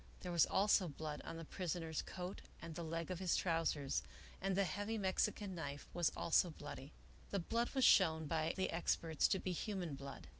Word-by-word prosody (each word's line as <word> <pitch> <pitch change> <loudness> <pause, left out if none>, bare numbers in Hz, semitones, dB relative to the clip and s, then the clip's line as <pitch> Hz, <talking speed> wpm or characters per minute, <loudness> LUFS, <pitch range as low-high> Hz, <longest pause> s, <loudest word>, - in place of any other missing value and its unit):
There 180 - -4
was 170 -2 +5
also 195 -2 +4
blood 150 0 -5
on 165 - -6
the 165 - -6
prisoner's 165 -2 -2
coat 180 +1 -6 0.2
and 165 -1 -7
the 170 - -5
leg 165 +2 -3
of 180 - -3
his 185 -2 +2
trousers, 165 -5 +1 0.4
and 190 0 0
the 200 - +4
heavy 205 +4 -2
Mexican 195 0 0
knife 145 -4 -5
was 175 -2 +2
also 175 +1 +4
bloody. 145 -2 -8 0.4
The 200 - -1
blood 230 +6 0
was 265 - +5
shown 160 -4 +6
by 160 +2 0
the 190 - 0
experts 165 -2 +1
to - - +2
be 185 - -2
human 180 -3 -3
blood. 140 0 -7
170 Hz, 190 wpm, -39 LUFS, 160-190 Hz, 0.4 s, shown